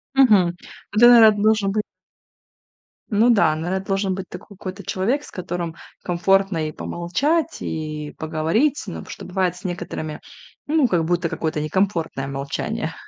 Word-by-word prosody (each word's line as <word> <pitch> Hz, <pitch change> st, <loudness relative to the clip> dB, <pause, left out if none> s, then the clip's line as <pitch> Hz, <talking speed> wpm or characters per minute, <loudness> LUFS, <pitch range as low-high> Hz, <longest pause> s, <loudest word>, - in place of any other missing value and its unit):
Мгм. 210 Hz, -10 st, +5 dB, 0.4 s
Ну, 215 Hz, -, +1 dB
тогда 240 Hz, -2 st, +9 dB
должен 210 Hz, -1 st, +2 dB
бы 215 Hz, -, +1 dB, 1.3 s
ну 220 Hz, +3 st, +3 dB
да, 170 Hz, -9 st, +4 dB
наверно, 180 Hz, +4 st, -2 dB
должен 195 Hz, -1 st, 0 dB
быть 190 Hz, 0 st, -6 dB
такой 200 Hz, -, -11 dB
какой-то 190 Hz, 0 st, -7 dB
человек, 235 Hz, +13 st, -1 dB
с -, -, -11 dB
которым 175 Hz, -2 st, -4 dB, 0.3 s
комфортно 180 Hz, -2 st, +1 dB
и -, -, -7 dB
помолчать, 285 Hz, -, -1 dB
и 155 Hz, -1 st, -5 dB
поговорить. 165 Hz, -, 0 dB
Ну -, -, -6 dB
потому -, -, -9 dB
что -, -, -8 dB
бывает 180 Hz, -1 st, -1 dB
с 180 Hz, -, -14 dB
некоторыми- 175 Hz, -4 st, -5 dB, 0.5 s
ну 305 Hz, -2 st, +3 dB
как 175 Hz, -7 st, +1 dB
будто 175 Hz, +1 st, 0 dB
какое-то 160 Hz, -1 st, -2 dB
некомфортное 165 Hz, -4 st, -1 dB
молчание 140 Hz, 0 st, -3 dB
185 Hz, 145 wpm, -22 LUFS, 165-210 Hz, 1.3 s, тогда